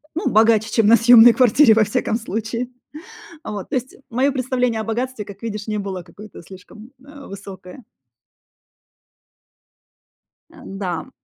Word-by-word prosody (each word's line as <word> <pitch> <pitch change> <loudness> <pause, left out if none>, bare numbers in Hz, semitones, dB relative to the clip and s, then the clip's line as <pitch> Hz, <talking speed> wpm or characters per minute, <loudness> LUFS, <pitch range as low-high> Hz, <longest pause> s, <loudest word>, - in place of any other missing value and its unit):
ну, 335 - -1
богаче, 220 0 +3
чем 225 -3 +2
на 230 - +7
съемной 235 0 +7
кваратире, 250 +1 +4
во 220 -1 +3
всяком 215 +2 -2
случае. 230 +2 -5 0.8
Вот 205 -3 -7
то - - -3
есть, 255 0 -4
мое 255 +4 0
представление 250 -3 -2
о - - -5
богатстве, 235 0 -4
как 200 -1 -13
видишь, 210 -1 -6
не 215 -1 -3
было 190 -3 -6
какое-то 210 +5 -14
слишком, 195 +6 -15
э, 285 -1 -13
высокое. 195 +3 -11 2.7
Н-да. 195 +2 -7
220 Hz, 135 wpm, -20 LUFS, 205-245 Hz, 2.7 s, на